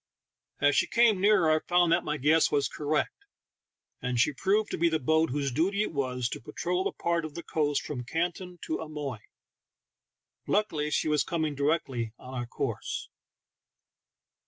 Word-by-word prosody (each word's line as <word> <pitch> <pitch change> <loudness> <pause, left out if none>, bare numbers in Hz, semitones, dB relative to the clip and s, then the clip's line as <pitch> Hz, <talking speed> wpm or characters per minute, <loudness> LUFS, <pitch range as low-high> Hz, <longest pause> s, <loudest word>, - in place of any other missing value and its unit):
As 145 0 +3
she - - +3
came 230 -5 +4
nearer 195 -6 +4
I 155 - +4
found 175 -1 +4
that 170 +1 +3
my 150 0 -2
guess 155 +4 +3
was 145 -1 +2
cor 150 - -7
rect, 155 - -1 0.8
and 125 -1 -1
she 145 +5 +3
proved 200 +8 +1
to - - -2
be 170 +1 +4
the 160 - +1
boat 160 +3 +2
whose 140 0 -1
duty 190 +10 +1
it - - -4
was 125 -4 -1
to - - -6
patrol 180 +9 -2
the - - -1
part 170 -1 -1
of 155 -2 -7
the 170 - -6
coast 145 -2 0
from 130 -5 -5
Canton 175 +5 -3
to 160 - -2
Amoy. 150 -7 -5 1.3
Luckily 160 -8 0
she 150 - 0
was 150 -2 +2
coming 160 -4 -1
directly 140 -6 -1
on 130 - -11
our 120 -2 -3
course. - - -4
155 Hz, 175 wpm, -28 LUFS, 140-170 Hz, 1.3 s, came